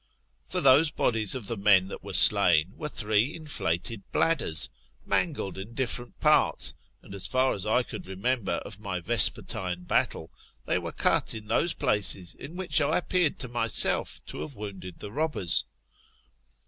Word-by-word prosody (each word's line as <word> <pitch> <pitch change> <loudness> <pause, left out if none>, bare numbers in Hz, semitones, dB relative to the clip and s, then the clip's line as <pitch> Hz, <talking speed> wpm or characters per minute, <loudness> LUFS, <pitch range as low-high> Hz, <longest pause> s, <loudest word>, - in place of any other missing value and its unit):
For - - -1
those 140 +4 +5
bodies 115 -6 0
of 125 -5 -5
the 115 - -3
men 100 -2 +3
that - - -9
were 100 -1 -8
slain 90 -4 +5
were 150 - -6
three 110 +5 0
inflated 115 - -3
bladders, 160 - +2 0.4
mangled 140 - -1
in 110 +5 -10
different 120 -1 -4
parts, 150 -2 +3 0.3
and - - -13
as 95 -2 -1
far 130 0 +1
as 100 - -3
I 125 +3 +2
could - - -9
remember 100 +4 -2
of 105 -1 -6
my 100 -4 -5
vespertine 90 -3 +1
battle, - - -1 0.3
they - - 0
were - - -6
cut - - +2
in 110 -1 -8
those 170 - +1
places 95 -4 0
in 155 +5 -11
which 180 -3 0
I 150 +2 +1
appeared 180 -3 0
to 125 -3 -4
have 110 -9 0
wounded 95 -4 -9
the 100 - -9
robbers. 145 - +2
110 Hz, 155 wpm, -26 LUFS, 95-135 Hz, 0.4 s, those